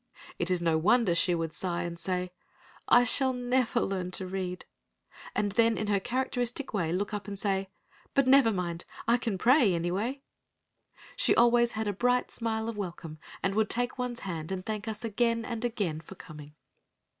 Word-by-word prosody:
It 175 - -1
is 180 -2 0
no 165 -2 +2
wonder 215 +2 +3
she 175 +1 +2
would 165 -1 -3
sigh 175 0 -2
and 170 -1 -5
say, 180 0 -2 0.6
"I 245 - +7
shall 260 +1 +3
never 250 -1 +1
learn 185 -2 -2
to 190 - -5
read," 185 -1 -4 0.7
and 205 -1 0
then 230 +2 +3
in 215 - -1
her 200 -1 +3
characteristic 245 +3 -2
way 170 -6 0
look 200 +4 -2
up 205 -1 -4
and 200 -1 -5
say, 195 -1 -1 0.5
"But 275 - +4
never 260 -3 +6
mind, 175 -3 -3 0.2
I 235 +1 +5
can 225 -5 -2
pray 240 - +4
anyway!" 200 +11 -2 0.9
She - - +3
always 240 0 +4
had 220 0 -2
a 205 - 0
bright 245 +5 +1
smile 220 -1 -2
of 230 -2 -4
welcome, 170 -5 -6 0.2
and 195 - +1
would 215 0 +1
take 245 +2 -1
one's 245 -1 -3
hand 165 -3 -5
and 185 -1 -4
thank 215 0 -4
us 220 +1 -4
again 230 +1 0
and 230 -1 -4
again 200 -10 -2
for 180 +4 -12
coming. 150 -3 -12
205 Hz, 185 wpm, -29 LUFS, 180-240 Hz, 0.9 s, I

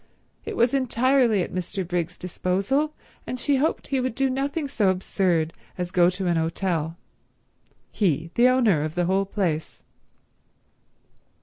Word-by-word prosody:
It - - -5
was 235 +2 +3
entirely 255 -5 +3
at - - -7
Mr. 185 +1 -3
Briggs's 175 -1 -2
disposal, 200 - -1 0.3
and 255 - -4
she 280 +2 +2
hoped 300 +5 -1
he 270 - +1
would 255 -2 -2
do 270 0 +1
nothing 280 +3 -2
so 215 -8 +1
absurd 180 -3 0 0.2
as 180 -1 -3
go 175 -1 +5
to 185 +1 -4
an 170 -1 +2
hotel—he, 165 0 -4
the 240 +1 +5
owner 235 - +3
of 155 +1 -3
the 175 0 +1
whole 190 +2 +1
place. 175 -6 -2
190 Hz, 140 wpm, -24 LUFS, 175-255 Hz, 0.3 s, go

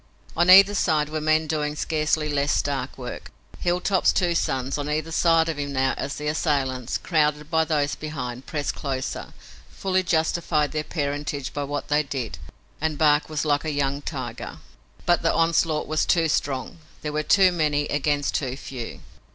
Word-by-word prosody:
On 175 +2 +3
either 195 +2 +9
side 155 -6 +1
were 155 0 -3
men 155 +1 +2
doing 150 -1 -2
scarcely 155 0 0
less 145 -1 0
stark 140 -2 -1
work. 125 -2 -7 0.3
Hilltop's 180 +2 +2
two 175 -2 +1
sons, 135 -3 -1
on 145 +1 -3
either 155 +2 -2
side 165 0 +3
of 160 -3 -3
him 140 -1 -3
now, 130 0 +1
as 140 - -4
the 150 - -6
assailants, 140 -5 0
crowded 150 -2 0
by 160 -1 +3
those 150 -3 0
behind, 130 -5 -6
pressed 145 -2 -2
closer, 135 -2 -4 0.4
fully 185 -1 0
justified 160 -3 +1
their 155 0 -2
parentage 145 -3 -3
by 145 -1 -2
what 145 +1 -4
they 150 +1 +3
did, 125 - -5 0.4
and 155 -1 -1
Bark 150 -1 +3
was 155 0 -2
like 145 -1 +1
a 160 - -2
young 140 -1 -1
tiger. - - -6 0.5
But 175 0 +3
the 165 - +2
onslaught 165 -2 +2
was 155 0 0
too 165 -2 +3
strong. 140 +1 -2 0.2
There 150 -1 -3
were 150 - 0
too 190 +4 +5
many 150 -4 +1
against 145 0 0
too 130 -2 -2
few. 125 -4 -7
150 Hz, 175 wpm, -24 LUFS, 140-160 Hz, 0.5 s, either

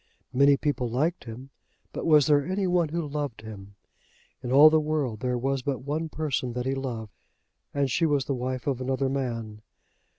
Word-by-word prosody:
Many 140 +2 +5
people 140 -5 -1
liked 150 +7 -1
him, 125 +4 -9 0.4
but - - -4
was 150 -3 +6
there 145 -2 +4
any 190 +5 -1
one 175 -3 +2
who 165 0 -3
loved 145 -6 -4
him? 100 -2 -10 0.7
In 125 -2 -5
all 145 +4 +8
the 160 - +4
world 150 -8 -2
there 125 0 -1
was 135 +2 -1
but 130 -1 -3
one 155 +3 -2
person 140 -6 -2
that 125 0 -3
he 135 - 0
loved, 120 -6 -5 0.6
and 140 -2 0
she 165 +6 +2
was 145 -3 +1
the 140 - -1
wife 130 0 -3
of 135 -3 -1
another 130 +1 0
man. 115 -6 -4
135 Hz, 190 wpm, -26 LUFS, 125-150 Hz, 0.7 s, all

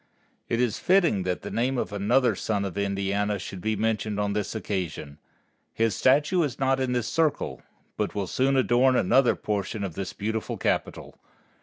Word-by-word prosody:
It 115 - 0
is 120 -3 0
fitting 175 - +3
that 90 - -2
the - - -6
name 125 +3 0
of 110 - -3
another 120 +6 +2
son 100 -2 -2
of 95 - -5
Indiana 100 +1 -1
should 95 -1 -7
be 110 +2 0
mentioned 110 -1 -1
on 100 0 0
this 105 +1 -2
occasion. 85 -8 -4 0.6
His 115 -1 +1
statue 145 +7 +3
is 140 -5 -1
not 135 0 +1
in 130 -1 0
this 120 -3 -1
Circle, 155 0 0 0.4
but - - -2
will 100 -2 -1
soon 135 +7 +1
adorn 130 0 +3
another 125 +4 +4
portion 105 0 -3
of 95 -4 -4
this 95 +2 -5
beautiful 110 +2 -3
capital. - - -2
110 Hz, 175 wpm, -26 LUFS, 100-130 Hz, 0.6 s, another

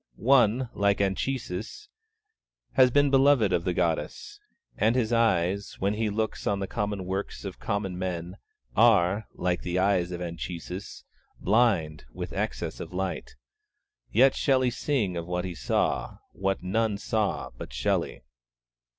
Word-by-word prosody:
One, 120 - +3
like 100 0 +2
Anchises, 100 - -2 0.8
has 130 -2 +5
been 145 +2 +3
beloved 135 -7 +4
of 85 -1 0
the 90 - +1
Goddess, 85 -2 -2 0.4
and 110 +3 +2
his 120 -2 +1
eyes, 100 -4 +1
when 100 +2 0
he 110 0 -1
looks 110 +1 -2
on 100 - +1
the 100 - -2
common 100 -2 -3
works 95 +2 -4
of 95 - -6
common 100 -3 -2
men, 90 0 -4 0.4
are, 90 +5 +4
like 90 0 -1
the 90 0 -2
eyes 95 -2 +2
of 90 - -4
Anchises, 90 +2 -6 0.4
blind 95 - +2
with - - -6
excess - - -3
of - - -7
light. 95 -4 -4 0.8
Let 130 +5 +5
Shelley 130 -3 +2
sing 115 -8 -1
of 85 0 -5
what 90 +1 -2
he 90 - -4
saw, 65 -7 -1
what 95 -1 -2
none 105 +2 0
saw 105 0 -1
but - - -8
Shelley! 60 0 -1
100 Hz, 140 wpm, -27 LUFS, 90-115 Hz, 0.8 s, has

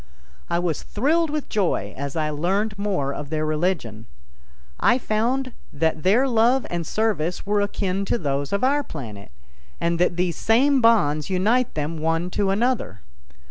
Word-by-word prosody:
I - - +1
was 175 -3 -1
thrilled 315 +9 +1
with 300 -1 -3
joy 170 - -1
as 140 +2 -5
I 155 -1 0
learned 195 +8 -1
more 185 -10 -1
of 145 0 -6
their 155 0 -1
religion. 150 - -2 0.7
I 240 - +4
found 250 +3 -1 0.2
that 160 +1 0
their 220 - +3
love 245 +2 +3
and 170 -2 -3
service 200 -6 -1
were 205 0 +1
akin 200 -1 -1
to - - 0
those 140 -5 -2
of 200 +5 0
our 285 +3 +2
planet, 110 - -8 0.5
and 170 0 0
that 175 -1 +2
these 175 -2 0
same 265 +5 +3
bonds 155 -11 +3
unite 215 +7 +1
them 155 +2 -3
one 165 +3 -1
to 200 0 0
another. 205 - 0
185 Hz, 160 wpm, -23 LUFS, 155-225 Hz, 0.7 s, I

